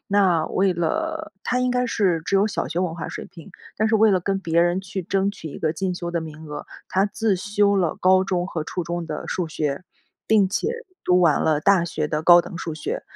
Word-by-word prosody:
那 190 -5 +3
为 190 0 +1
了 320 - -2
她 250 - 0
应 250 0 +1
该 250 0 +1
是 185 -8 +1
只 195 - +1
有 200 +2 +3
小 205 - -3
学 165 +5 -3
文 180 -3 -1
化 170 - -5
水 - - -7
平， 165 -5 -14 0.3
但 220 - +2
是 220 - +3
为 220 0 +5
了 185 -2 +2
跟 195 +2 -1
别 170 -3 +1
人 175 +2 +1
去 190 0 -5
争 195 +3 0
取 165 -6 -9
一 - - -8
个 160 0 -1
进 185 +1 -2
修 175 -1 -5
的 170 -1 -2
名 155 0 -9
额， 150 0 -7 0.2
她 190 +1 +2
自 210 0 0
修 200 +2 +1
了 175 -5 0
高 185 0 +4
中 180 -2 -1
和 165 -5 -4
初 180 - -3
中 170 0 -4
的 155 -1 -5
数 180 - -2
学， 150 -1 -2 0.4
并 210 -3 +4
且 205 - -1 0.4
读 180 0 +4
完 165 -4 +4
了 155 -2 +2
大 190 +1 +4
学 155 -2 -2
的 150 +1 -2
高 175 +1 +8
等 170 - -8
数 165 -2 -4
学。 155 - -4
180 Hz, 255 characters per minute, -23 LUFS, 165-200 Hz, 0.4 s, 高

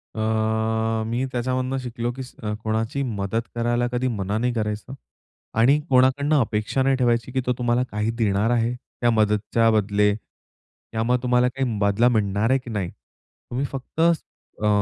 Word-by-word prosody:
अ, 110 0 0
मी 120 +3 -1
त्याच्यामधून 130 +2 -1
शिकलो 120 -1 -3
की 130 +1 -6
स 125 - -13 0.3
कोणाची 110 +5 -1
मदत 110 -2 -2
करायला 120 +1 +1
कधी 125 +1 0
मना 105 -3 -2
नाही 125 +2 0
करायचं. 105 +2 -3 0.6
आणि 125 +7 +5
कोणाकडनं 135 +3 +4
अपेक्षा 110 +2 0
नाही 135 0 +3
ठेवायची 120 -1 +1
की 130 - 0
तो 125 - +2
तुम्हाला 120 0 +1
काही 105 +2 -1
देणार 105 -1 +2
आहे, 120 0 +1 0.3
त्या 120 - +4
मदतीच्या 110 +1 +2
बदले. 105 -1 +2
त्यामुळे 115 +2 -5
तुम्हाला 125 0 +3
काही 125 -3 -2
बदला 100 +4 +3
मिळणार 105 -1 +1
आहे 135 +1 +3
की 130 - -11
नाही? 100 -5 -2
तुम्ही 120 - -8
फक्त 135 +3 -7 0.6
अ, 105 - +2
115 Hz, 155 wpm, -23 LUFS, 110-125 Hz, 0.6 s, आणि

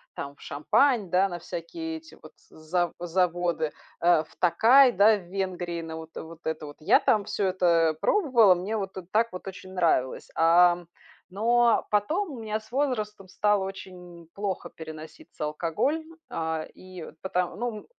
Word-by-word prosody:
там 140 0 -6
в - - -21
Шампань, 210 - +1
да, 185 +3 +3
на 175 -2 -6
всякие 320 - -6
эти 320 +1 -15
вот - - -13 0.2
за 170 +3 -2
заводы, 175 -2 0 0.3
э, 170 -2 +4
в - - -21
Токай, 240 +8 +6
да, 210 +1 +5
в 190 - -11
Венгрии, 180 -3 -3
на 160 0 -7
вот 160 0 -10
вот 160 0 -9
это 160 -1 -3
вот. 145 - -11
Я 155 - +4
там 210 -2 +2
всё 195 - -1
это, 185 -1 -1 0.3
э, - - -6
пробовала, 245 - +4
мне 200 +5 -3
вот, 195 -2 -5
э, 185 - -5
так 230 +2 +3
вот 185 - -8
очень 190 0 -9
нравилось, 165 -8 0
ам. 175 +1 +4 0.5
Но 235 +2 +3
потом 315 - +1
у 250 - -8
меня 215 0 -2
с 220 +2 -20
возрастом 215 -8 -2
стало 205 0 +1
очень 180 -3 -9
плохо 200 -2 -3
переноситься 155 -1 -9
алкоголь, 165 - -1 0.3
а, 160 -1 -3
и 185 -3 -10 0.2
потом 180 -1 -2
ну 235 -3 -4
185 Hz, 165 wpm, -27 LUFS, 165-215 Hz, 0.5 s, Токай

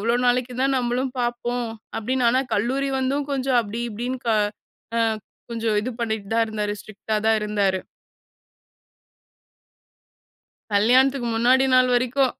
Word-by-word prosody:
எவ்வளோ 230 +3 +2
நாளைக்கு 245 0 +1
தான் 270 0 +2
நம்மளும் 250 +1 -1
பார்ப்போம் 240 0 -1 0.3
அப்டின்னு. 250 +3 0
ஆனா 255 +2 +3
கல்லூரி 260 +6 0
வந்தும் 275 +2 0
கொஞ்சம் 265 -2 +1
அப்டி 220 +2 -5
இப்டின்னு 245 +4 -4
க - - +2 0.7
அ - - +2 0.5
கொஞ்சம் 225 -2 0
இது 255 - -3
பண்ணிட்டு 220 -3 -3
தான் 230 - +4
இருந்தாரு 210 -1 -2
ஸ்ட்ரிக்ட்டா 215 +1 -4
தான் 220 0 +4
இருந்தாரு. 200 -3 +1 2.9
கல்யாணத்துக்கு 245 +4 +3
முன்னாடி 250 +3 +4
நாள் 255 0 +5
வரைக்கும். 255 +1 +2
240 Hz, 125 wpm, -23 LUFS, 220-255 Hz, 2.9 s, நாள்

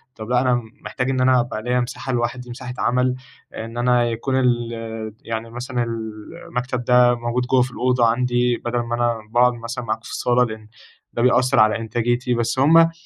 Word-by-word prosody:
طب 110 0 -8
لأ، 125 0 +3
أنا 125 -1 +2 0.2
محتاج 125 0 -2
إن 130 -1 0
أنا 130 0 +4
أبقى 120 -2 -3
ليَّ 125 +1 +1
مساحة 125 +2 -4
لوحدي، 120 +1 -2
مساحة 125 +1 -7
عمل، 125 +1 +1 0.4
إن 115 +1 -7
أنا 120 0 +3
يكون 115 +4 -2
الت 115 -3 -1
يعني 115 0 -4
مثلًا 120 +1 -3 0.6
المكتب 125 0 -3
ده 125 0 +5
موجود 120 +1 -2
جوّا 130 0 +3
في 125 +1 -1
الأوضة 125 -1 +2
عندي، 120 +1 +1
بدل 120 0 0
ما 120 0 -2
أنا 120 -1 0
باقعُد 125 +1 +4
مثلًا 120 +1 -6
معاكم 110 -1 -2
في - - -10
الصالة، 125 0 +2
لإن 110 -2 -8 0.5
ده 120 - -2
بيأثّر 125 +1 +3
على 110 +1 +5
إنتاجِيتي، 120 +2 -1
بس 120 +1 -1
همّ 150 +5 +6
آآ، 165 0 +6
120 Hz, 190 wpm, -21 LUFS, 115-125 Hz, 0.6 s, همّ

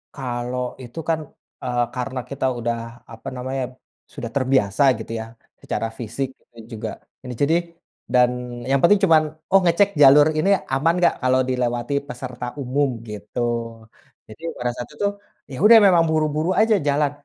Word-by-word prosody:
Kalau 125 -1 -4
itu 125 +7 -9
kan, 160 -1 +2 0.4
eee, 120 -1 0
karena 125 +1 -3
kita 140 -1 -3
udah 115 0 -4
apa 115 - -11
namanya, 130 +1 -3 0.5
sudah 115 - -6
terbiasa 130 -4 +2 0.2
gitu 110 - -8
ya, 110 - -5 0.4
secara 115 - -2
fisik 120 +4 -3
itu 120 - -28 0.2
juga - - -4 0.4
n 125 - -6
jadi 145 +7 +1 0.6
dan 125 -1 +5 0.4
yang 135 - +4
penting 195 +4 +6
cuman, 160 -3 +5 0.3
oh 195 - +6
ngecek 175 +4 +4
jalur 145 +2 +8
ini 190 +6 +2 0.2
aman 160 +5 +2
nggak, 175 - +4
kalau 130 0 +3
dilewati 120 +1 -1
peserta 125 0 -7 0.2
umum, 135 +2 0 0.2
gitu. 105 +3 -7 0.9
Jadi 110 +8 -14 0.2
pada 125 0 -1
saat 120 - -7
itu, 200 - -2 0.5
ya 130 - -6
udah 230 +2 +9
memang 175 -3 +5
buru-buru 155 +1 0
aja 220 0 +4
jalan, 145 0 +2
130 Hz, 155 wpm, -22 LUFS, 120-150 Hz, 0.9 s, udah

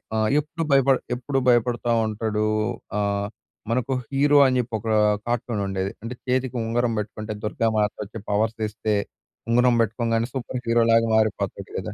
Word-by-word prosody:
ఆహ్, 110 0 +2
ఎప్పుడు 160 +3 -4
భయపడ 135 0 +5 0.2
ఎప్పుడు 135 +2 -1
భయపడతా 120 0 +2 0.2
ఉంటాడు. 110 0 -1 0.5
ఆహ్, 100 0 0 0.4
మనకు 125 +3 0 0.2
హీరో 145 +1 +3
అని 130 -1 +1
జెప్పి 120 -1 -2
ఒక 110 - -5 0.4
కార్టూన్ 120 -2 -1
ఉండేది. 95 0 -2
అంటే 115 +2 -5
చేతికి 130 0 0
ఉంగరం 120 +1 0
బెట్టుకుంటే 110 +1 -5
దుర్గామాతొచ్చి 110 -1 -1
పవర్స్ 110 +2 0
ఇస్తే, 105 0 -2 0.5
ఉంగరం 125 +1 +4
బెట్టుకోగానే 115 +1 0
సూపర్ 125 -1 -4
హీరో 115 0 +4
లాగా 115 0 +4
మారిపోతాడు 110 -1 -1
గదా! - - -4
115 Hz, 140 wpm, -24 LUFS, 110-125 Hz, 0.5 s, భయపడ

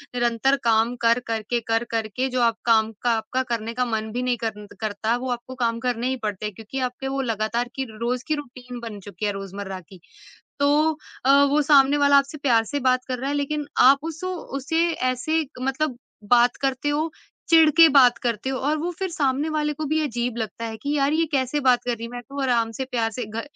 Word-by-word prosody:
निरंतर 240 +3 +2
काम 230 +1 +2
कर-कर 230 -1 +1
के 240 - +1
कर-कर 225 -1 0
के, 255 +5 -2
जो 255 -1 -1
आप 230 -2 +2
काम 225 -1 +3
का 240 - +2
आपका 260 +4 -2
करने 230 0 -3
का 250 +1 0
मन 220 -2 -3
भी 250 +2 -2
नहीं 250 -1 0
करन्त 210 -2 -6
करता, 215 +2 -1
वो 255 +1 -5
आपको 245 +2 -5
काम 230 0 +1
करने 245 0 0
ही 260 - 0
पड़ते 210 -1 -3
हैं, 210 - -4
क्योंकि 225 +5 -6
आपके 260 +2 -7
वो 270 0 -1
लगातार 230 0 -1
की 265 -1 -2
रोज़ 240 +3 -2
की 310 - +1
रूटीन 250 -3 -8
बन 210 -2 -7
चुकी 205 +2 -6
है, 205 - +1
रोज़मर्रा 195 -1 -6
की। 185 +1 -16 0.6
तो 300 +2 +3 0.3
अ, 270 - +3 0.2
वो 300 +1 +3
सामने 285 -1 +5
वाला 285 0 +5
आपसे 280 +2 0
प्यार 240 -5 +3
से 285 +4 -3
बात 255 0 +2
कर 255 -1 -2
रहा 270 +2 -2
है, 290 - -1
लेकिन 290 +1 -2 0.2
आप 275 +2 +5
उसो 340 +3 -4 0.2
उसे 325 +5 +1
ऐसे 255 +4 0
क 260 -3 -13
मतलब 270 0 -1 0.3
बात 240 0 +5
करते 270 +1 0
हो, 310 +2 -1 0.4
चिढ़ 325 -2 +7
के 330 -1 +10
बात 255 -4 +6
करते 235 +2 -1
हो, 265 - -2
और 295 +3 0
वो 330 +3 -2
फिर 380 - -1
सामने 290 -1 0
वाले 300 -1 -1
को 310 +1 -5
भी 310 +1 +1
अजीब 240 -3 -2
लगता 225 +1 -4
है 220 -1 -5
कि, 285 +6 -3
"यार, 280 +1 +2
ये 325 +1 +2
कैसे 270 +1 0
बात 245 -1 +4
कर 245 - -1
रही 230 - -9
है? - - -8
मैं 245 - -6
तो 280 - -6
आराम 235 -3 +1
से, 265 - -2
प्यार 230 -3 -1
से 245 - -2
घ" 220 +2 -5
250 Hz, 230 wpm, -23 LUFS, 230-285 Hz, 0.6 s, के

